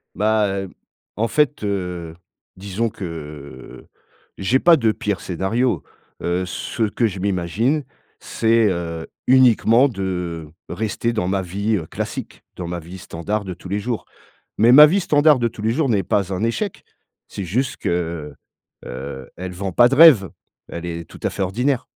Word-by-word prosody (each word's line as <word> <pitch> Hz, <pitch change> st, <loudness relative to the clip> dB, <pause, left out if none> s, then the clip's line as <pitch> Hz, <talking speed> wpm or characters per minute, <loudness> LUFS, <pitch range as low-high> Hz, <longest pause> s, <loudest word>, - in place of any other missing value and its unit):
Bah 110 Hz, 0 st, +2 dB
heu, 95 Hz, -1 st, -3 dB, 0.5 s
en 115 Hz, +2 st, 0 dB
fait 150 Hz, -3 st, +1 dB
heu, 90 Hz, -5 st, -3 dB, 0.4 s
disons 100 Hz, +4 st, -2 dB
que, 100 Hz, -3 st, -8 dB
heu, 75 Hz, -6 st, -9 dB, 0.5 s
j'ai 110 Hz, +7 st, +2 dB
pas 170 Hz, +3 st, +6 dB
de 115 Hz, -6 st, +2 dB
pire 105 Hz, -4 st, -3 dB
scénario. 105 Hz, +8 st, -1 dB, 0.4 s
Heu, 90 Hz, +2 st, 0 dB
ce 95 Hz, +5 st, -4 dB
que 115 Hz, +2 st, 0 dB
je 95 Hz, -3 st, -4 dB
m'imagine, 100 Hz, -, 0 dB, 0.4 s
c'est, 115 Hz, -1 st, +2 dB
heu, 85 Hz, -2 st, -4 dB, 0.2 s
uniquement 125 Hz, 0 st, +5 dB
de 90 Hz, -, -4 dB, 0.2 s
rester 110 Hz, +4 st, -2 dB
dans 90 Hz, -5 st, -1 dB
ma 95 Hz, 0 st, 0 dB
vie, 100 Hz, +5 st, -1 dB
heu, 80 Hz, -5 st, -4 dB
classique, -, -, -6 dB
dans 90 Hz, -, -5 dB
ma 85 Hz, 0 st, -3 dB
vie 90 Hz, +4 st, -10 dB
standard 100 Hz, +6 st, -4 dB
de 95 Hz, -2 st, -5 dB
tous 90 Hz, -, -12 dB
les 100 Hz, +2 st, -1 dB
jours. 115 Hz, +1 st, -3 dB, 0.5 s
Mais 115 Hz, +3 st, +6 dB
ma 150 Hz, +3 st, +11 dB
vie 190 Hz, +6 st, +2 dB
standard 150 Hz, -4 st, +4 dB
de 120 Hz, -1 st, +1 dB
tous 110 Hz, -2 st, -10 dB
les 110 Hz, -, +1 dB
jours 145 Hz, +1 st, 0 dB
n'est 105 Hz, -5 st, +2 dB
pas 95 Hz, +1 st, 0 dB
un 90 Hz, -, -3 dB
échec. 175 Hz, -, -2 dB, 0.4 s
C'est 100 Hz, -, -6 dB
juste 125 Hz, +9 st, -1 dB
que, 85 Hz, -4 st, -3 dB, 0.5 s
heu, 65 Hz, 0 st, -7 dB
elle 90 Hz, +1 st, -6 dB
vend 95 Hz, +1 st, -4 dB
pas 120 Hz, +4 st, +6 dB
de 135 Hz, -, +1 dB
rêve. 135 Hz, -, +7 dB, 0.4 s
Elle 85 Hz, +1 st, -6 dB
est 85 Hz, -1 st, -5 dB
tout -, -, -13 dB
à -, -, 0 dB
fait 100 Hz, -, -3 dB
ordinaire. 125 Hz, +7 st, 0 dB
100 Hz, 170 wpm, -21 LUFS, 90-115 Hz, 0.5 s, ma